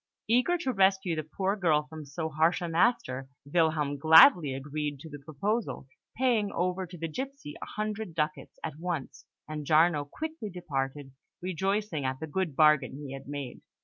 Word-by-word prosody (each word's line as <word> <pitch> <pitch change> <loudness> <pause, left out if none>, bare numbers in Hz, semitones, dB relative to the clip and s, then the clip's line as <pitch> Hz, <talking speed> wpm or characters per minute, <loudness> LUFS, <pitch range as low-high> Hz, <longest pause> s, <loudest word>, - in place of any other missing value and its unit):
Eager 250 +10 +3
to 265 -7 -2
rescue 190 -3 +3
the 155 - -1
poor 190 +6 -2
girl 160 -7 +2
from 155 -1 -9
so 150 +4 -4
harsh 160 +2 +2
a 175 - -3
master, 165 - +1 0.2
Wilhelm 150 -2 +1
gladly 160 - +8
agreed 145 +1 -4
to 160 +3 -11
the 145 - -8
proposal, 165 - -3 0.3
paying 230 -5 +2
over 180 +1 -1
to 175 +1 -10
the 165 0 -3
gipsy 265 - -6
a - - -4
hundred 215 -4 -4
ducats 150 -1 -3
at 150 - -5
once; 170 -6 -4 0.2
and 155 0 -5
Giarno 155 -1 +4
quickly 315 - -5
departed, 140 -6 -4 0.3
rejoicing 190 -2 -1
at 130 0 -2
the 160 - -4
good 160 -1 -2
bargain 150 -3 +4
he 140 -2 -7
had 135 0 -9
made. 140 -3 -6
160 Hz, 170 wpm, -29 LUFS, 145-195 Hz, 0.3 s, gladly